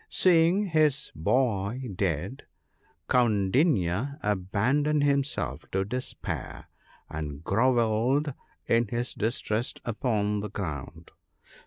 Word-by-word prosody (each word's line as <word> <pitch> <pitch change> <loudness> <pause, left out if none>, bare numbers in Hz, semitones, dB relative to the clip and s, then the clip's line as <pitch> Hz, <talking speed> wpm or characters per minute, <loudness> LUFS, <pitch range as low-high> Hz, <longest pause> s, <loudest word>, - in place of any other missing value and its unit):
Seeing 180 +3 +4
his 155 -4 +2
boy 115 - 0
dead, 90 - -2 0.6
Kaundinya 115 - +2
abandoned 110 +10 +1
himself 140 0 0
to 95 0 0
despair, 125 +5 -5 0.4
and 75 -1 -6
grovelled 120 - +2 0.3
in 115 0 +2
his 120 +4 -2
distress 110 +1 -1
upon 105 -3 0
the 105 +1 -4
ground. 80 -4 -6
115 Hz, 85 wpm, -27 LUFS, 95-135 Hz, 0.6 s, Seeing